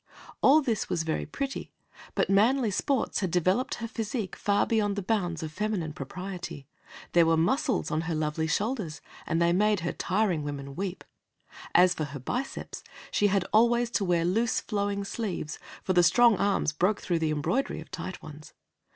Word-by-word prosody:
All 295 +3 +6
this 230 -6 -1
was 170 -2 0
very 160 -1 -2
pretty, 270 - -4 0.4
but - - +2
manly 225 +4 +3
sports 260 +6 0
had 190 - -1
developed 185 - +1
her 230 - -5
physique 220 -2 -4
far 205 0 +1
beyond 210 -3 +1
the 200 - -3
bounds 180 -6 -1
of 155 - -5
feminine 185 -4 -2
propriety. 180 0 -7 0.5
There 170 -1 +5
were 165 0 +3
muscles 255 - +1
on 155 - +1
her 165 - 0
lovely 155 +1 -1
shoulders, 205 - -1 0.3
and 165 - +1
they 170 0 +3
made 210 0 +2
her 170 - -1
tiring 185 -4 0
women 140 -1 -6
weep. 190 0 -4 0.7
As 180 0 +6
for 155 - -3
her 140 -1 -7
biceps, 250 - -4 0.3
she 205 - +3
had 195 -2 +1
always 235 +2 +4
to 205 - +1
wear 175 -3 +2
loose, 225 +6 +1
flowing 200 -1 -2
sleeves, 195 -7 -4 0.2
for 185 - 0
the 180 - +6
strong 230 +7 +5
arms 200 -5 +1
broke 185 +7 +1
through 175 -3 -1
the 160 -1 0
embroidery 155 - -1
of - - -11
tight 185 0 -6
ones. 155 0 -11
190 Hz, 175 wpm, -28 LUFS, 165-220 Hz, 0.7 s, All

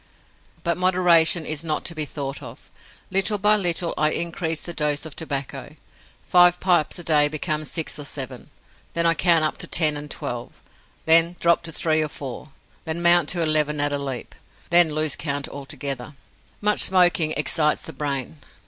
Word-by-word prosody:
But 170 0 -1
moderation 175 -3 +3
is 155 0 -3
not 155 -2 -3
to 170 - -1
be 155 -2 -3
thought 140 -2 -6
of; - - -13 0.4
little 195 +2 +2
by 210 +2 +3
little 175 -4 0
I 155 0 +3
increase 165 0 -2
the 175 - -6
dose 150 -1 -1
of 155 - -10
tobacco. 140 -4 -6 0.5
Five 180 0 +5
pipes 175 -5 +2
a 175 - -6
day 150 -3 +3
become 155 0 -3
six 160 +1 -2
or 145 - -7
seven. 130 -4 -4 0.5
Then 170 0 +1
I 165 - +4
count 165 0 +2
up 155 - -2
to - - -3
ten 155 -3 +2
and 145 0 -7
twelve, 120 -3 -6 0.5
then 165 +2 +6
drop 170 0 +2
to - - -5
three 155 0 0
or 155 - -2
four, 140 0 -8 0.3
then 160 +2 -4
mount 175 -2 +4
to 175 -2 0
eleven 150 -1 +1
at 145 0 0
a 145 - -2
leap; 135 -3 -7 0.4
then 175 -1 +7
lose 155 -2 0
count 145 -1 -4
altogether. 140 -1 -6 0.5
Much 210 0 +2
smoking 175 -4 +4
excites 150 +1 0
the - - -8
brain. 135 - -4
155 Hz, 175 wpm, -22 LUFS, 145-170 Hz, 0.5 s, then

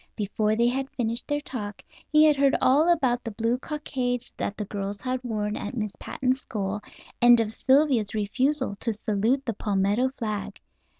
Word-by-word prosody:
Before 210 +1 0
they 235 +2 +2
had 265 +2 -1
finished 235 -1 -2
their 290 0 0
talk 210 -8 -6 0.3
he 305 0 +6
had 305 -1 +6
heard 275 0 +3
all 295 +6 +4
about 255 -7 +1
the 230 - -4
blue 230 +3 -1
cockades 255 -5 -3
that 205 - -3
the 210 - -3
girls 200 0 -4
had 255 +3 -3
worn 210 -3 -2
at 255 - -5
Miss 210 -3 -3
Patten's 260 0 -1
school, 205 -1 -3 0.4
and 240 0 +7
of 220 -2 0
Sylvia's 260 -6 +2
refusal 260 +4 0
to 230 -1 -1
salute 220 +6 0
the 230 - -1
palmetto 205 +5 +1
flag. 215 -3 -4
235 Hz, 175 wpm, -26 LUFS, 210-260 Hz, 0.4 s, and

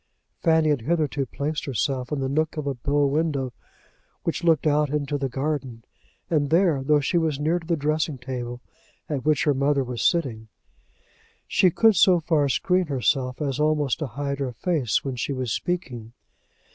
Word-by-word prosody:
Fanny 160 -2 +3
had 145 -5 +1
hitherto 145 -1 0
placed 145 +5 -3
herself 130 -1 -2
in 145 -2 -1
the 135 - 0
nook 155 +4 -1
of 150 - -3
a 140 - -1
bow 140 +3 +1
window 140 -3 0 0.7
which 165 +1 -2
looked 165 -3 +3
out 150 -1 +2
into 145 0 -2
the 135 -2 -1
garden, 135 -4 -3 0.4
and 150 -4 +1
there, 165 -4 +3
though 150 +2 +3
she 155 +5 +1
was 155 -4 -1
near 160 +4 +1
to 165 - -14
the 170 -2 +1
dressing 150 0 -1
table 120 -1 -6 0.5
at 145 -6 -3
which 155 +1 +2
her 145 - +3
mother 140 +1 +1
was 125 -2 -5
sitting, 125 -10 0 1.0
she 185 - +4
could 220 +5 +4
so 185 -2 +5
far 155 -3 +1
screen 180 +7 +1
herself 130 -1 0
as 140 -1 -2
almost 150 -4 +1
to 155 - -2
hide 140 +2 -4
her 130 -3 -2
face 140 -3 0
when 135 -2 -3
she 130 +3 -2
was 130 -3 -3
speaking. 125 -11 -4
145 Hz, 180 wpm, -24 LUFS, 130-155 Hz, 1.0 s, so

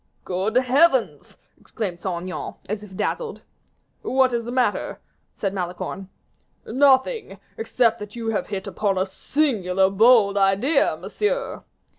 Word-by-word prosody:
"Good 190 +5 -2
heavens!" 260 +1 +2 0.2
exclaimed 185 -7 -5
Saint 175 -3 -3
Aignan, 185 0 -6
as 210 +1 -3
if 200 -3 -12
dazzled. 455 - -3 0.6
"What 260 -1 +2
is 235 -1 -1
the 240 - -5
matter?" 255 0 0 0.4
said 195 -2 -2
Malicorne. 185 +1 -5 0.6
"Nothing, 270 - +2 0.2
except 245 - +1
that 210 +1 -9
you 230 -1 -3
have 220 - -1
hit 195 -2 -4
upon 200 -3 -1
a 185 - +1
singular, 195 -5 0
bold 205 -1 +5
idea, 200 - +2
monsieur." 420 - -2
215 Hz, 130 wpm, -23 LUFS, 190-260 Hz, 0.6 s, bold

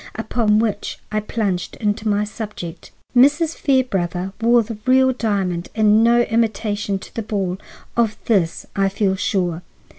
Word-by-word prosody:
Upon 220 -1 +1
which 215 -2 -1
I 215 - +1
plunged 205 -4 -2
into 210 0 -1
my 205 0 +2
subject. 210 -5 -7 0.3
"Mrs. 295 +6 +4
Fairbrother 195 - 0
wore 235 +1 +4
the 220 -1 -7
real 260 0 +5
diamond, 195 -7 -1
and 215 0 +4
no 235 +1 +5
imitation, 215 -3 0
to - - -12
the 230 - -3
ball. 195 -4 -2 0.4
Of 225 -2 +1
this 185 -8 +1
I 195 -1 +2
feel 195 -1 0
sure. 180 -3 -1
210 Hz, 145 wpm, -20 LUFS, 195-230 Hz, 0.4 s, real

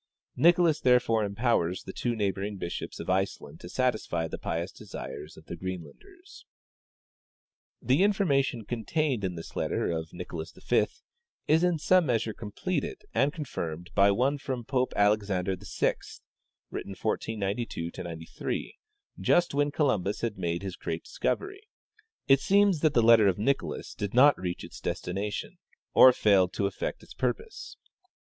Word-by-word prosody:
Nicolas 170 -1 +4
therefore 125 -3 +3
empowers 100 -4 0
the 95 - -8
two 120 -1 -1
neighboring 100 -1 -2
bishops 85 -2 -5
of - - -6
Iceland 95 -5 -1
to 85 - -10
satisfy 110 -9 0
the - - -6
j)ious 85 +3 -3
desires 80 -7 -8
of 80 - -14
the 85 - -6
Greenlanders. 95 - -9 1.4
"The 130 +7 +3
information 140 - +2
contained 125 +2 -1
in 90 -2 -2
this 80 - -9
letter - - -1
of 80 -1 -4
Nicolas 85 -2 -7
V - - +2 0.6
is 160 +3 +4
in 175 -2 +3
some 180 +2 +3
measure 115 -3 0
completed 135 - -4
and 135 +5 +3
confirmed 90 - -5
by 100 0 +5
one 130 +8 +1
from 130 -4 -4
Pope 130 0 0
Alexander 100 -3 +2
VI, - - 0 0.8
written 100 - -5
1492 105 -5 -2
'93, 80 -2 -5 0.4
just 175 -3 +3
when 145 +1 +2
Columbus 120 - 0
had 115 -3 -1
made 85 -1 -2
his 95 -2 -5
great - - -4
discovery. 400 0 -2 0.7
It 135 -1 +6
seems 200 0 +3
that 155 -1 +2
the 120 - +5
letter 115 -2 +7
of 95 - +2
Nicolas 135 +7 -1
did 100 +2 -4
not 140 +3 +7
reach 90 -1 -4
its - - -10
destination, 105 +1 -4 0.3
or 130 - +9
failed 95 -6 +3
to 100 - 0
effect 100 -1 -3
its - - -13
purpose. 445 0 -4
110 Hz, 145 wpm, -28 LUFS, 95-140 Hz, 1.4 s, or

